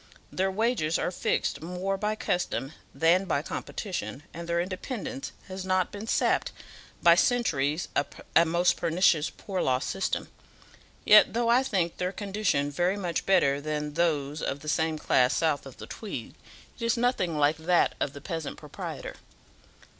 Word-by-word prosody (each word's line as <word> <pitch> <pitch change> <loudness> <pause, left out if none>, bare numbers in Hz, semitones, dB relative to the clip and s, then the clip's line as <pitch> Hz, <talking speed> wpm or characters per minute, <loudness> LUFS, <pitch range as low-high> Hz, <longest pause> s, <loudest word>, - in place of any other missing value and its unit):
Their 190 +1 0
wages 195 -6 +1
are - - -1
fixed 175 - -1
more 180 +4 -2
by 210 +2 -1
custom 175 -8 -2 0.2
than 175 +4 +3
by 150 -5 0
competition, 170 -6 -5
and 170 0 -7
their 170 0 +1
independence 245 +9 -4 0.2
has 190 0 -6
not 185 -1 +1
been 205 +2 -7
sapped - - +1 0.5
by 170 - +8
centuries 165 - +1
of 140 - +2 0.3
a - - +8
most 170 +2 +2
pernicious 165 -2 +3
poor 190 -2 -4
law 130 -1 +2
system; 195 +8 -2 0.8
yet, 210 0 +7
though 235 0 +1
I 240 +2 +5
think 190 -10 -1
their 180 0 -1
condition 195 -8 -1
very 175 +6 +1
much 175 -4 -2
better 140 -7 +3
than 150 0 -3
those 150 -3 0
of 140 +1 -3
the 155 - -10
same 160 +1 +1
class 125 -4 +3
south 150 -4 0
of 135 - -12
the - - -8
Tweed, 190 - -7 0.5
it - - -6
is 230 +1 +2
nothing 220 -10 +1
like 150 +1 +3
that 170 +2 +2
of 140 - -1
the 140 - -9
peasant 160 -1 -5
proprietor." - - -7
175 Hz, 160 wpm, -28 LUFS, 155-195 Hz, 0.8 s, by